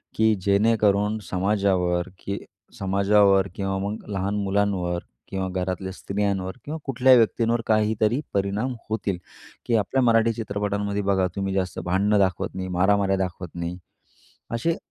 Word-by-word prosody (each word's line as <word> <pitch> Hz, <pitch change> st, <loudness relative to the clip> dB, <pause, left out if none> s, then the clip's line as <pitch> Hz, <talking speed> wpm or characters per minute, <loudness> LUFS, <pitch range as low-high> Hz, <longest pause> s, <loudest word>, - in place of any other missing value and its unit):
की 110 Hz, 0 st, +4 dB
जेणेकरून 105 Hz, +1 st, +2 dB
समाजावर 95 Hz, -2 st, +1 dB
की 100 Hz, 0 st, -4 dB, 0.4 s
समाजावर 100 Hz, 0 st, +4 dB
किंवा 95 Hz, -1 st, -2 dB
मग 100 Hz, +3 st, -4 dB
लहान 100 Hz, +1 st, -1 dB
मुलांवर 95 Hz, -3 st, 0 dB, 0.3 s
किंवा 95 Hz, -1 st, -2 dB
घरातल्या 95 Hz, +1 st, -3 dB
स्त्रियांवर 100 Hz, +1 st, -2 dB
किंवा 155 Hz, +2 st, -4 dB
कुठल्याही 130 Hz, -1 st, +5 dB
व्यक्तींवर 115 Hz, 0 st, +2 dB
काहीतरी 110 Hz, +2 st, +2 dB
परिणाम 100 Hz, +6 st, 0 dB, 0.2 s
होतील. 105 Hz, -4 st, -1 dB, 0.5 s
की 115 Hz, -, +1 dB
आपल्या 115 Hz, +5 st, +1 dB
मराठी 115 Hz, -1 st, +4 dB
चित्रपटांमध्ये 100 Hz, -1 st, -2 dB
बघा 95 Hz, -2 st, +2 dB
तुम्ही 95 Hz, -1 st, -2 dB
जास्त 95 Hz, -1 st, -2 dB
भांडणं 100 Hz, +3 st, +2 dB
दाखवत 95 Hz, -3 st, 0 dB
नाही, 95 Hz, 0 st, -4 dB
मारामाऱ्या 95 Hz, +2 st, +2 dB
दाखवत 90 Hz, -2 st, -3 dB
नाही. 85 Hz, +1 st, -4 dB, 0.7 s
असे, 140 Hz, +9 st, 0 dB
100 Hz, 130 wpm, -24 LUFS, 95-110 Hz, 0.7 s, कुठल्याही